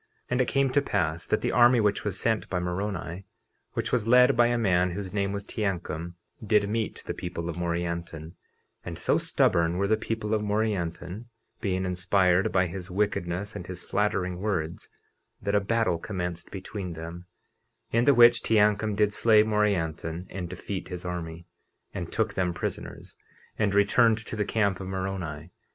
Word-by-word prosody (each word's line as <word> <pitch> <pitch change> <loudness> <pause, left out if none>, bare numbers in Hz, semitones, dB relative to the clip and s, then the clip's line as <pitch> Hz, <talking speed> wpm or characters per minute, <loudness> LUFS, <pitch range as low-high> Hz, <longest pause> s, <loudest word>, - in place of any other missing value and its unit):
50:35 - - -42 0.2
And 125 +1 +2
it 125 - +1
came 135 -1 +2
to 145 - +3
pass 85 - -1
that 110 - +1
the - - +1
army 120 0 +6
which 105 -2 +1
was 100 -3 -2
sent 110 -2 0
by 90 - -1
Moroni, 90 0 -3 0.5
which - - -2
was 115 -3 +1
led 125 +3 +6
by 120 0 +5
a 120 0 +1
man 90 -5 +2
whose 95 0 -5
name 100 -1 0
was 100 0 -4
Teancum, 85 -5 -3 0.3
did 105 -1 +3
meet 110 +1 -2
the - - -3
people 85 -1 -5
of 85 - -4
Morianton; 85 -2 -3 0.5
and - - -6
so - - +2
stubborn 85 -1 +2
were 100 +1 +1
the 110 - +4
people 110 -1 -3
of 110 - +1
Morianton, 105 -2 -2 0.3
(being 95 -2 -1
inspired 90 0 +2
by 95 -1 +3
his 90 +1 -6
wickedness 100 0 -1
and 90 - -6
his 90 -1 -7
flattering 95 -4 -1
words) 85 -6 -2 0.5
that 100 - -2
a 105 - +5
battle 110 -4 +1
commenced 90 -3 -4
between 95 -1 -6
them, 85 +2 -8 0.6
in 115 +1 +3
the 140 - +6
which 120 0 +7
Teancum 105 -1 +2
did 105 0 +2
slay 110 -1 +5
Morianton 90 -6 -1
and 90 -2 -5
defeat 95 +2 -5
his 90 -1 -7
army, 85 -1 -5 0.5
and 85 -2 -5
took 110 -1 0
them 90 -2 -1
prisoners, - - -6 0.4
and 105 -2 +1
returned 110 +3 +4
to - - -5
the 105 -1 0
camp 100 -3 +1
of 95 - -6
Moroni. 95 -4 -4
95 Hz, 175 wpm, -27 LUFS, 90-105 Hz, 0.6 s, which